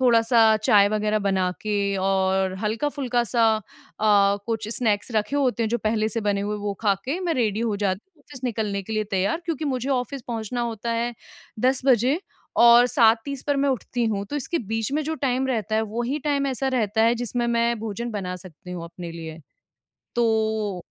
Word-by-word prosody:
थोड़ा-सा 230 -2 +5
चाय 205 -1 +4
वगैरह 215 0 0
बना 190 -2 +1
के 215 -1 -1 0.2
और 190 0 +1
हल्का-फुल्का 245 +2 0
सा 235 0 +2
अ, 215 - -6 0.8
कुछ 225 -2 -2
स्नैक्स 215 -2 0
रखे 215 +6 0
होते 255 -4 +1
हैं 225 - 0
जो 240 - +1
पहले 215 -1 0
से 230 +1 -2
बने 205 -2 0
हुए, 205 +1 -2
वो 205 -1 -3
खा 205 -3 +4
के 280 +7 -2
मैं 345 -3 0
रेडी 220 -4 0
हो 225 -3 0
जाती 195 -2 -1 0.2
हूँ 295 - -26
ऑफिस 270 -3 -11
निकलने 215 -4 -2
के 220 - -7
लिए 215 0 0
तैयार 195 - 0
क्योंकि 320 -3 -3
मुझे 260 -2 -2
ऑफिस 260 +1 -2
पहुँचना 230 +1 -3
होता 235 -1 -3
है 235 +1 -1 0.5
10 260 +2 +2
बजे 260 - +3 0.4
और 235 +1 +8
7:30 245 +2 +2
पर 285 -1 +1
मैं 280 +1 +2
उठती 245 -1 -1
हूँ, 200 -2 -1
तो 290 - -4
इसके 310 +5 -2
बीच 225 +2 -2
में 305 +2 +1
जो 320 +2 -2
टाइम 265 -3 0
रहता 220 -4 -1
है 220 - +3
वो 235 +3 -2
ही 265 +5 -1
टाइम 285 -2 +1
ऐसा 265 0 -1
रहता 220 -4 +1
है 230 +1 +4
जिसमें 240 0 -2
मैं 235 0 +1
भोजन 225 +2 -4
बना 190 -4 -4
सकती 180 -1 -12
हूँ 175 -2 -5
अपने 170 0 -8
लिए। 160 -1 -8 0.8
तो, 220 -4 0
225 Hz, 200 wpm, -24 LUFS, 205-250 Hz, 0.8 s, और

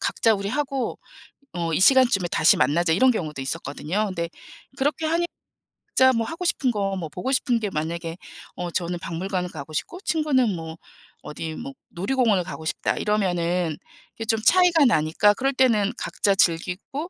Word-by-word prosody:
각자 225 -1 +2
우리 200 0 -4
하고, 275 -1 -2 0.6
어 170 -2 -2
이 - - +1
시간쯤에 240 -7 +5
다시 - - +5
만나자." 165 +2 +2
이런 255 +8 +4
경우도 155 - -4
있었거든요. 160 +7 -2
근데 170 -3 -4 0.5
그렇게 295 +3 -1
하니 335 +2 +1 0.6
각자 260 0 +4
뭐 230 -1 0
하고 345 +2 -5
싶은 265 -7 +1
것, 195 -2 -2
뭐 165 -4 -5
보고 220 - -4
싶은 245 -3 +1
게 210 - -3
만약에 165 +2 -4 0.4
'어 175 -1 -4
저는 175 0 -2
박물관을 180 +2 -3
가고 155 -1 -9
싶고, 355 - -4
친구는 265 - +1
뭐 160 0 -7 0.5
어디 160 +1 -6
뭐 275 +2 -7 0.2
놀이공원을 200 0 +1
가고 160 -3 -8
싶다.' - - -1
이러면은 175 -5 0 0.4
이게 225 - -6
좀 225 0 +1
차이가 355 -4 +5
나니까 190 - +3
그럴 270 +3 0
때는 230 -5 +2
각자 200 -1 0
즐기고 185 - 0
195 Hz, 350 characters per minute, -23 LUFS, 170-260 Hz, 0.6 s, 시간쯤에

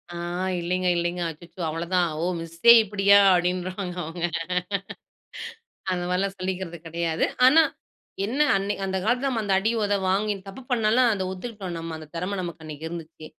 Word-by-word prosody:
ஆ, - - -5 0.4
இல்லைங்க 180 +1 -1
இல்லைங்க. 175 +1 -1
அச்சச்சோ 170 +3 -11
அவ்வளோ 165 +2 -3
தான். 175 -1 +3
ஓ! - - -1 0.2
மிஸ்ஸே. 165 +7 +4
இப்டியா? 200 0 +4 0.2
அப்டின்னுருவாங்க. 180 +1 -1
அவங்க, 165 +2 -6 1.7
அந்த 180 -1 -1
மாரில்லாம் 195 +2 0
சொல்லிக்கிறது 185 -2 -4
கிடையாது. 165 0 0 0.2
ஆனா, 310 +5 +8 0.6
என்ன 265 +8 -1
அன் 195 0 0 0.2
அந்தக் 190 -1 -2
காலத்துல 250 +4 +1
அந்த 195 -2 +1
அடி, 220 +3 +1
உத 205 0 +1
வாங்கி 205 +2 +1
தப்பு 195 +7 -9
பண்ணாலும் 235 +1 +3
அத 190 -2 -2
ஒத்துக்கிட்டோம் 190 -3 -6
நம்ம. 165 -1 -5
அந்தத் 155 +1 -13
திறமை 185 +4 -2
நமக்கு 170 -2 -6
அன்னைக்கு 155 +1 -7
இருந்துச்சு. 160 -2 -8
180 Hz, 150 wpm, -25 LUFS, 170-200 Hz, 1.7 s, ஆனா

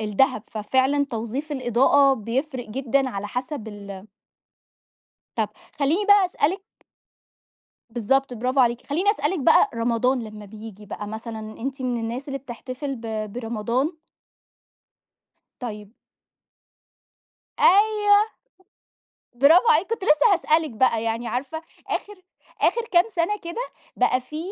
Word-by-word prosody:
الدهب 215 +1 +1
ففعلًا 260 +6 +1
توظيف 235 +7 -4
الإضاءة 270 +2 +4
بيفرِق 255 +2 -3
جدًا 265 +3 0
على 200 -1 -4
حسب 250 0 -5
ال 200 -1 -9 1.3
طَب 220 -2 +1 0.3
خلّيني 310 +9 +2
بس 405 -3 +4
أسألِك 370 +7 +1 1.3
بالضبط 250 +3 0
برافو 255 +3 0
عليكِ. 240 -1 +1
خلّيني 360 +8 +2
أسألِك 380 -4 -1
بقى 265 - +5
رمضان 240 +2 +1
لمّا 215 -1 -9
بييجي 210 0 -11
بقى 210 - -6
مثلًا 220 +1 -6 0.2
أنتِ 270 +2 -4
من 250 -1 -1
الناس 235 +5 -5
اللي 275 0 -3
بتحتفل 260 +2 -6
ب 220 -3 -5
برمضان؟ 235 - -1 1.7
طيب 210 -4 -7 1.7
أيوه. 415 +1 +5 1.2
برافو 315 - +6
عليكِ، 395 -5 +4
كنت 460 -3 -3
لسّه 300 +6 +5
هسألِك 320 -3 +2
بقى 230 -1 +2
يعني 230 +1 -2
عارفة 280 +6 -3 0.3
آخِر 415 - -3 0.5
آخِر 470 - +3
كام 345 -1 +6
سَنة 345 +5 +1
كده 340 +7 -4 0.4
بقى 255 - +2
في 280 +5 -9
255 Hz, 115 wpm, -24 LUFS, 225-300 Hz, 1.7 s, برافو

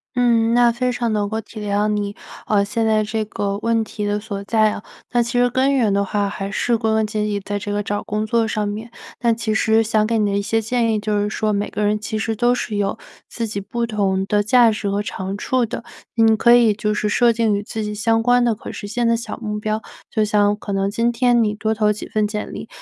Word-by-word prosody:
嗯， 235 -2 +3
那 240 -1 +5
非 250 +2 -1
常 235 -2 -1
能 205 -1 0
够 220 +1 -2
体 220 0 -10
谅 205 0 0
你， 205 -1 -2 0.3
呃， 200 -2 +2
现 225 +2 -1
在 215 -1 +3
这 215 +1 -2
个 200 -1 -3
问 230 0 +1
题 210 -1 -5
的 205 0 0
所 205 -2 -6
在 215 0 +3
啊， 205 - -6 0.3
那 240 - +3
其 235 +1 -3
实 245 0 +4
根 265 +3 +2
源 225 -6 +2
的 200 0 +2
话 200 +1 -1
还 195 0 -4
是 235 +4 0
归 220 -1 0
根 220 0 +2
结 215 0 -3
底 210 -1 -1
在 205 +1 -4
这 205 0 -5
个 205 0 -1
找 205 0 -2
工 215 +1 -2
作 225 +1 +1
上 215 -1 -1
面。 215 +3 -5 0.3
但 235 -1 +2
其 225 -2 -1
实 220 +1 +3
想 215 -1 +1
给 230 0 +1
你 210 -2 +1
的 - - 0
一 200 - +1
些 225 +2 0
建 230 +1 0
议 215 - +1
就 210 0 -1
是 205 - -1
说， 215 0 -1
每 205 +1 -1
个 210 - -3
人 210 +1 +1
其 215 +1 -4
实 220 +1 -2
都 240 +3 +2
是 220 -3 -3
有 200 +1 -1 0.3
自 230 -1 -4
己 205 -2 -4
不 235 +4 -3
同 195 -4 0
的 205 +1 +2
价 235 +2 +5
值 205 -1 -3
和 200 +1 -1
长 195 -1 -4
处 255 +4 0
的， 230 0 -4 0.3
你 225 -1 +5
可 235 +2 +5
以 235 -3 +5
就 210 +1 -2
是 210 0 -1
设 235 +3 +4
定 225 -2 +1
与 200 - -1
自 220 +1 -5
己 210 0 -3
相 225 +1 +1
关 245 +1 +4
的 235 -2 +2
可 210 - -8
实 205 - -7
现 235 +3 0
的 230 - +3
小 230 0 -5
目 210 -2 -4
标， 215 0 -1 0.3
就 215 -1 +1
像 205 0 +2
可 205 -1 -5
能 195 0 0
今 230 +3 +1
天 240 -1 +3
你 210 -1 0
多 220 +1 -1
投 210 -1 +2
几 210 - -8
份 215 -1 +1
简 210 0 -5
历， - - -7
215 Hz, 280 characters per minute, -20 LUFS, 205-230 Hz, 0.3 s, 那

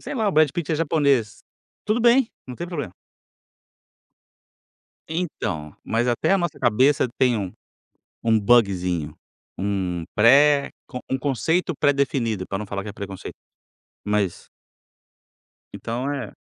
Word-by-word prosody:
Sei - - -6
lá 220 -4 +1
o - - -1
Brad 155 -2 +5
Pitty 170 -3 -2
é - - +2
japonês. 140 -8 +1 0.4
Tudo 215 +3 +1
bem, 240 +1 +4 0.2
não 125 - -7
tem 175 - -6
problema. 150 - -5 2.2
Então, 155 - -4
mas 115 +2 0
até 120 +9 +1
a 195 - +4
nossa 175 -4 -3
cabeça 130 +3 +3
tem 125 -3 +3
um 95 -3 -4 0.7
um 110 -1 +3
bugezinho, 90 -9 +2 0.4
um 95 -3 -2
pré 140 +6 +5 0.4
um 130 - 0
conceito 150 - 0
predefinido 135 -8 +1
para 95 - -3
não 105 - -5
falar 100 0 -4
que 105 - -8
é 100 - -6
preconceito. 100 -2 -8 0.7
Mas 105 -3 -1 1.2
Então 120 +4 -4
é 130 -7 -5
125 Hz, 130 wpm, -23 LUFS, 100-150 Hz, 2.2 s, Brad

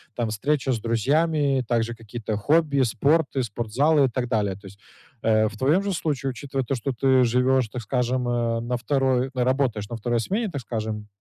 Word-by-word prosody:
там, 120 -2 -1
встреча 135 +5 0
с 120 - 0
друзьями, 140 +6 +1
и - - -2
также 120 0 -1
какие-то 110 -1 -5
хобби, 150 +5 +2
и 135 - +4
спорт, 140 +7 +1
и 135 - +2
спортзалы, 125 +7 +1
и - - 0
так 125 +1 -2
далее. 105 -5 0
То 100 +1 -13
есть, 100 +1 -14 0.4
э, 110 -1 +3
в 105 -1 -8
твоем 150 - +2
же 200 - -1
случае, 145 -5 -2
учитывая 135 +1 -4
то, 135 - -1
что 130 +3 -3
ты 130 +1 +3
живешь, 125 +1 +2
так 120 +3 -5
скажем, 125 +2 -1
э, 120 -1 0
на 120 +1 -2
второй 130 0 0
на 125 -2 0
работаешь 125 -5 0
на 120 - -4
второй 120 +2 -1
смене, 210 - -1
так 140 - -4
скажем. 110 -3 -4
125 Hz, 210 wpm, -24 LUFS, 115-140 Hz, 0.4 s, и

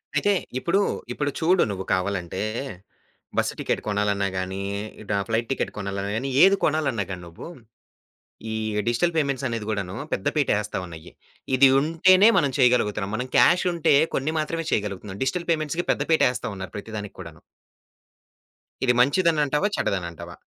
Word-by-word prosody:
అయితే 205 - +3 0.3
ఇప్పుడు 175 +8 +1 0.3
ఇప్పుడు 145 -1 -2
చూడు 175 +3 +3
నువ్వు 95 -1 -5
కావాలంటే, 95 -1 -2 1.0
బస్సు - - +1
టికెట్ - - -1
కొనాలన్నా 100 -1 0
గాని, 95 +1 -3 0.5
డా 100 - +1
ఫ్లైట్ 115 +1 -1
టికెట్ 135 - -1
కొనాలన్నా 100 0 -3
గాని, 135 +4 -3
ఏది 195 +1 +6
కొనాలన్నా 135 -9 0
గాని, 90 -1 -6
నువ్వు 85 - -10 1.1
ఈ - - -2 0.3
డిజిటల్ 125 +9 +1
పేమెంట్సనేది 130 -6 -1
కూడాను, 100 -3 -3 0.2
పెద్ద 95 - -2
పీట 145 -3 +1
ఏస్తా 105 - -5
ఉన్నాయి. 80 -1 -11 0.4
ఇది 135 +1 +7
ఉంటేనే 185 +7 +5
మనం 145 -6 +2
చేయగలుగుతున్నాం, 105 -5 +2
మనం 125 +3 -3
క్యాషుంటే 175 -2 +4 0.2
కొన్ని 145 +4 -1
మాత్రమే 165 +2 -2
చేయగలుగుతున్నాం, 100 -1 -3
డిజిటల్ 170 +6 -2
పేమెంట్స్‌కి 160 +2 -1
పెద్ద - - 0
పీట 160 - +4
ఏస్తా 125 - -5
ఉన్నారు 95 -2 -8
ప్రతి 110 +2 -8
దానికి 105 -1 -7
కూడాను. 85 -4 -10 1.4
ఇది 125 - +4
మంచిదనంటావా? 150 +3 +2
చెడ్డదనంటావా? 85 -4 -3
120 Hz, 140 wpm, -24 LUFS, 100-155 Hz, 1.4 s, ఇది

